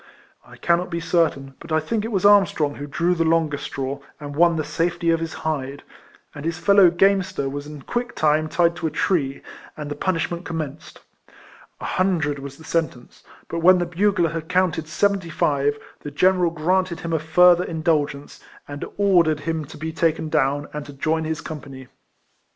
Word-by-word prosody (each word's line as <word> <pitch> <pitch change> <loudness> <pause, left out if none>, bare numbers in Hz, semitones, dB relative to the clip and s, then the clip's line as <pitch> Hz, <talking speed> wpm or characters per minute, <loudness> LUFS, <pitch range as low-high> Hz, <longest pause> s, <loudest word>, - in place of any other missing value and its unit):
I - - -15
cannot 175 +1 +1
be 170 -1 -3
quite 165 - -9
certain, 135 -6 +1
but - - -12
I 155 - +3
think 210 +7 -2
it 225 - -4
was 195 -2 0
Armstrong 195 -8 +4
who 145 0 -7
drew 170 +5 +1
the 165 -2 0
longest 160 -3 +1
straw, 135 +1 -4 0.2
and 145 -1 -7
won 170 +2 +4
the 155 - -1
safety 170 +2 0
of 165 - +1
his 165 0 -4
hide; 140 -3 -3 0.5
and 145 - -9
his 165 0 -2
fellow 200 0 +6
gamester 190 -5 +1
was 145 +1 -5
in 150 -2 -10
quick 240 0 -3
time 155 0 +2
tied 170 0 +2
to 160 0 -2
a - - -1
tree? 150 -3 -1 0.3
and 150 -1 -6
the - - -3
punishment 170 +1 -2
commenced. 155 -4 -6 0.8
A - - -7
hun 185 -1 +1
dred 150 -2 -2
was 140 0 -9
the 160 - -14
sentence; 160 -7 -3 0.2
but 170 - -3
when 185 +2 +6
the 175 - 0
bugler 175 -1 +1
had 165 -1 -5
counted 180 -4 +1
seventy 195 +2 0
five, 145 -2 +1 0.2
the 145 - -7
general 180 +4 +3
granted 170 +2 0
him 165 -1 -4
a 160 - +2
further 175 +3 +5
indulgence, 155 -4 -2 0.3
and 145 0 -7
ordered 175 -7 +3
him 160 0 -3
to - - -12
be 160 +1 -5
taken 160 0 0
down, 145 -1 +1
and 150 0 -4
to 145 - -10
join 160 +3 -1
his 160 0 -3
company. 135 -4 -9
160 Hz, 190 wpm, -22 LUFS, 145-175 Hz, 0.8 s, fellow